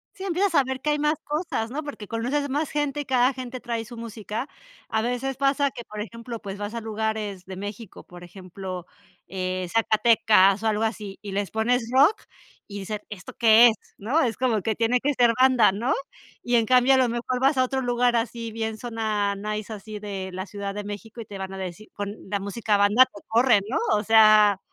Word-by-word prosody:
Sí, 380 Hz, -, -7 dB
empiezas 375 Hz, -1 st, 0 dB
a 280 Hz, -, +5 dB
ver 265 Hz, 0 st, -4 dB
que 300 Hz, -, -1 dB
hay 295 Hz, 0 st, +1 dB
más 300 Hz, +1 st, +2 dB
cosas, 295 Hz, -7 st, -3 dB
¿no? 305 Hz, +3 st, -4 dB
Porque 285 Hz, -8 st, -7 dB
conoces 265 Hz, +5 st, -1 dB
más 295 Hz, +2 st, -1 dB
gente, 295 Hz, -1 st, -1 dB
y 290 Hz, -, -3 dB
cada 255 Hz, 0 st, +3 dB
gente 255 Hz, 0 st, -7 dB
trae 230 Hz, -2 st, -3 dB
su 240 Hz, -, -10 dB
música. 230 Hz, +2 st, -6 dB, 0.4 s
A 220 Hz, 0 st, 0 dB
veces 250 Hz, +2 st, -2 dB
pasa 275 Hz, 0 st, +2 dB
que, 240 Hz, -, -8 dB
por 210 Hz, 0 st, -7 dB
ejemplo, 230 Hz, +1 st, -7 dB
pues 195 Hz, -1 st, -6 dB
vas 205 Hz, +2 st, -5 dB
a 230 Hz, -, -3 dB
lugares 215 Hz, -3 st, -3 dB
de 190 Hz, 0 st, -8 dB
México, 205 Hz, +2 st, -8 dB
por 175 Hz, 0 st, -12 dB
ejemplo, 185 Hz, 0 st, -8 dB, 0.4 s
eh, 185 Hz, -1 st, -3 dB
Zacatecas 215 Hz, -3 st, +4 dB
o -, -, +1 dB
algo 215 Hz, +1 st, +1 dB
así, 210 Hz, -3 st, -3 dB
y 205 Hz, -2 st, -7 dB
les 200 Hz, 0 st, -2 dB
pones 230 Hz, +1 st, 0 dB
rock, 285 Hz, +10 st, +6 dB, 0.5 s
y 200 Hz, -1 st, -7 dB
dicen: 210 Hz, +2 st, -4 dB
"¿Esto 200 Hz, -3 st, -9 dB
qué 230 Hz, +1 st, +8 dB
es?",¿no? 230 Hz, +6 st, -2 dB
Es 230 Hz, -5 st, 0 dB
como 235 Hz, -5 st, 0 dB
que 220 Hz, +2 st, -1 dB
tiene 235 Hz, +2 st, +2 dB
que 290 Hz, +3 st, 0 dB
ser 240 Hz, -2 st, +4 dB
banda, 255 Hz, -6 st, +5 dB
¿no? 235 Hz, +7 st, -1 dB, 0.5 s
Y 245 Hz, 0 st, +1 dB
en 230 Hz, -1 st, +4 dB
cambio, 255 Hz, +2 st, +5 dB
a -, -, +3 dB
lo 255 Hz, -1 st, +3 dB
mejor 240 Hz, +2 st, -2 dB
vas 270 Hz, +1 st, +3 dB
a 255 Hz, -, +4 dB
otro 265 Hz, +1 st, -1 dB
lugar 245 Hz, -1 st, +1 dB
así 230 Hz, 0 st, -3 dB
bien, 220 Hz, 0 st, -3 dB
zona 215 Hz, -4 st, -1 dB
nice, 210 Hz, +2 st, -5 dB
así 210 Hz, 0 st, -7 dB
de 195 Hz, -2 st, -5 dB
la 185 Hz, +1 st, -4 dB
Ciudad 200 Hz, 0 st, -6 dB
de 210 Hz, -, -4 dB
México 210 Hz, +3 st, -8 dB
y -, -, -8 dB
te 200 Hz, -1 st, -9 dB
van 190 Hz, 0 st, -6 dB
a 195 Hz, -, -7 dB
decir 190 Hz, +3 st, -7 dB
con 205 Hz, 0 st, -4 dB, 0.2 s
la 200 Hz, -1 st, -1 dB
música 210 Hz, +2 st, -1 dB
banda 205 Hz, +5 st, +5 dB
te 205 Hz, -6 st, -14 dB
corren, 235 Hz, -2 st, +4 dB
¿no? 255 Hz, -, 0 dB, 0.2 s
O 210 Hz, -, 0 dB
sea, 215 Hz, -2 st, +6 dB
225 Hz, 215 wpm, -25 LUFS, 205-250 Hz, 0.5 s, qué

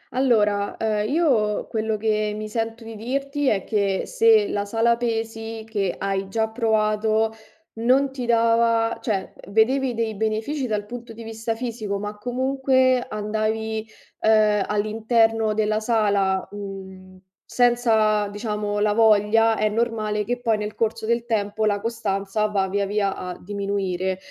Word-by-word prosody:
Allora, 210 Hz, -6 st, +2 dB
uhm, 215 Hz, -2 st, 0 dB
io, 250 Hz, -8 st, +1 dB
quello 220 Hz, -1 st, -1 dB
che 215 Hz, -1 st, 0 dB
mi 215 Hz, 0 st, -5 dB
sento 225 Hz, +1 st, -3 dB
di 225 Hz, 0 st, -9 dB
dirti 275 Hz, +5 st, -2 dB
è 195 Hz, -6 st, +2 dB
che 200 Hz, -3 st, 0 dB
se 450 Hz, -4 st, +4 dB
la 205 Hz, -, -1 dB
sala 225 Hz, +3 st, +2 dB
pesi, 225 Hz, -1 st, -3 dB
che 200 Hz, -5 st, -1 dB
hai 195 Hz, 0 st, -2 dB
già 220 Hz, +2 st, 0 dB
provato, 220 Hz, -1 st, +1 dB, 0.5 s
non 265 Hz, +4 st, +3 dB
ti 255 Hz, -3 st, -5 dB
dava 230 Hz, 0 st, +2 dB
cioè, 200 Hz, -5 st, -2 dB, 0.2 s
vedevi 245 Hz, +4 st, +2 dB
dei 225 Hz, -1 st, -1 dB
benefici 220 Hz, +7 st, -2 dB
dal 210 Hz, -2 st, -2 dB
punto 235 Hz, +1 st, -8 dB
di 230 Hz, +1 st, -10 dB
vista 225 Hz, 0 st, -4 dB
fisico 225 Hz, -4 st, -4 dB
ma 205 Hz, +1 st, -5 dB
comunque 260 Hz, +1 st, +1 dB
andavi, 220 Hz, +1 st, -2 dB, 0.3 s
uhm, 215 Hz, -2 st, +4 dB
all'interno 220 Hz, +1 st, +1 dB
della 215 Hz, 0 st, +1 dB
sala, 205 Hz, -4 st, +1 dB
mhmm, 190 Hz, -2 st, -9 dB, 0.3 s
senza, 225 Hz, -4 st, +2 dB
diciamo, 210 Hz, 0 st, -3 dB
la 210 Hz, 0 st, +2 dB
voglia, 220 Hz, +1 st, +4 dB
è 215 Hz, -, +2 dB
normale 215 Hz, -1 st, -1 dB
che 245 Hz, +3 st, -3 dB
poi 225 Hz, -3 st, +1 dB
nel 210 Hz, 0 st, -4 dB
corso 225 Hz, 0 st, -2 dB
del 235 Hz, +1 st, +1 dB
tempo 215 Hz, -2 st, -1 dB
la 205 Hz, -1 st, +1 dB
costanza 210 Hz, -2 st, -1 dB
va 200 Hz, -2 st, 0 dB
via 200 Hz, +1 st, -1 dB
via 200 Hz, -1 st, 0 dB
a 180 Hz, -1 st, -6 dB
diminuire. 190 Hz, -2 st, -2 dB
220 Hz, 145 wpm, -23 LUFS, 210-230 Hz, 0.5 s, se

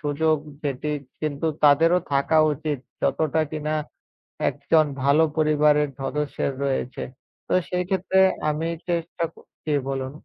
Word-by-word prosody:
সুযোগ। 155 Hz, +2 st, +1 dB, 0.3 s
যেটি 145 Hz, +1 st, -2 dB, 0.3 s
কিন্তু 150 Hz, 0 st, -2 dB, 0.2 s
তাদেরও 165 Hz, +5 st, +6 dB
থাকা 140 Hz, +3 st, +3 dB
উচিত 150 Hz, 0 st, -3 dB, 0.2 s
যতটা 160 Hz, 0 st, +1 dB
কিনা 155 Hz, 0 st, -2 dB, 0.8 s
একজন 155 Hz, -1 st, +2 dB, 0.2 s
ভালো 140 Hz, +3 st, +5 dB
পরিবারের 150 Hz, -1 st, +3 dB
সদস্যের 140 Hz, 0 st, -2 dB
রয়েছে। 130 Hz, -2 st, -2 dB, 0.4 s
তো -, -, -1 dB, 0.2 s
সেই 180 Hz, 0 st, 0 dB
ক্ষেত্রে 190 Hz, 0 st, +1 dB, 0.3 s
আমি 155 Hz, +2 st, -1 dB, 0.2 s
চেষ্টা 170 Hz, 0 st, -2 dB
ক -, -, -40 dB, 0.3 s
জি, 155 Hz, -, 0 dB, 0.2 s
বলুন। 135 Hz, -1 st, -3 dB
150 Hz, 125 wpm, -24 LUFS, 145-160 Hz, 0.8 s, তাদেরও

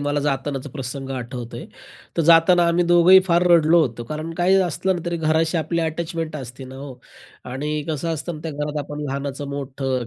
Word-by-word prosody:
मला 145 Hz, 0 st, -1 dB
जातानाचा 135 Hz, -1 st, -2 dB
प्रसंग 135 Hz, -1 st, -6 dB
आठवतोय. 125 Hz, -2 st, -6 dB, 0.5 s
तर 165 Hz, -, +2 dB
जाताना 170 Hz, +1 st, +6 dB
आम्ही 175 Hz, +1 st, +2 dB
दोघंही 175 Hz, +2 st, +7 dB
फार 170 Hz, 0 st, +3 dB
रडलो 170 Hz, 0 st, +5 dB
होतो, 120 Hz, -4 st, -2 dB
कारण 155 Hz, +2 st, -4 dB
काहीही 180 Hz, +2 st, +3 dB
असलं 185 Hz, +2 st, -1 dB
ना -, -, -5 dB
तरी 170 Hz, 0 st, -1 dB
घराशी 160 Hz, +1 st, +1 dB
आपली 165 Hz, +2 st, -1 dB
अटॅचमेंट 165 Hz, -1 st, -3 dB
असते 130 Hz, 0 st, -8 dB
ना 130 Hz, +1 st, -11 dB
हो? 135 Hz, -1 st, -8 dB, 0.6 s
आणि 150 Hz, +3 st, -3 dB, 0.2 s
कसं 155 Hz, +1 st, -2 dB
असतं 160 Hz, +2 st, -4 dB
ना, 150 Hz, -, -9 dB
त्या 165 Hz, -, -4 dB
घरात 150 Hz, +1 st, -3 dB
आपण 150 Hz, 0 st, -7 dB
लहानाचं 140 Hz, 0 st, -4 dB
मोठं 135 Hz, -3 st, -3 dB
150 Hz, 185 wpm, -22 LUFS, 135-170 Hz, 0.6 s, दोघंही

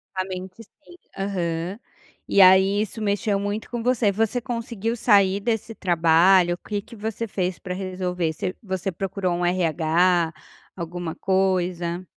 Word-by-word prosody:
A 185 Hz, -, 0 dB
mente 185 Hz, +3 st, -8 dB
sim, 315 Hz, +10 st, -19 dB, 0.2 s
aham. 180 Hz, -1 st, -3 dB, 0.5 s
E 200 Hz, -, +4 dB
aí 190 Hz, +2 st, +6 dB
isso 220 Hz, +1 st, -5 dB
mexeu 205 Hz, 0 st, 0 dB
muito 205 Hz, +2 st, -4 dB
com 240 Hz, -1 st, -4 dB
você. 240 Hz, -4 st, +2 dB
Você 225 Hz, +4 st, 0 dB
conseguiu 230 Hz, -2 st, -3 dB
sair 200 Hz, -4 st, +3 dB
desse 225 Hz, +1 st, -2 dB
trabalho? 175 Hz, 0 st, +4 dB
O -, -, -17 dB
que 205 Hz, -1 st, -1 dB
que 230 Hz, -, -14 dB
você 220 Hz, +2 st, -4 dB
fez 185 Hz, -3 st, -2 dB
pra 180 Hz, -3 st, -5 dB
resolver? 180 Hz, -3 st, -2 dB
Você 185 Hz, +4 st, -4 dB
você 190 Hz, -2 st, -3 dB
procurou 190 Hz, 0 st, -2 dB
um 175 Hz, 0 st, -1 dB
RH, 170 Hz, 0 st, +2 dB, 0.5 s
alguma 170 Hz, -1 st, -5 dB
coisa? 185 Hz, -2 st, 0 dB
190 Hz, 150 wpm, -23 LUFS, 180-205 Hz, 0.5 s, aí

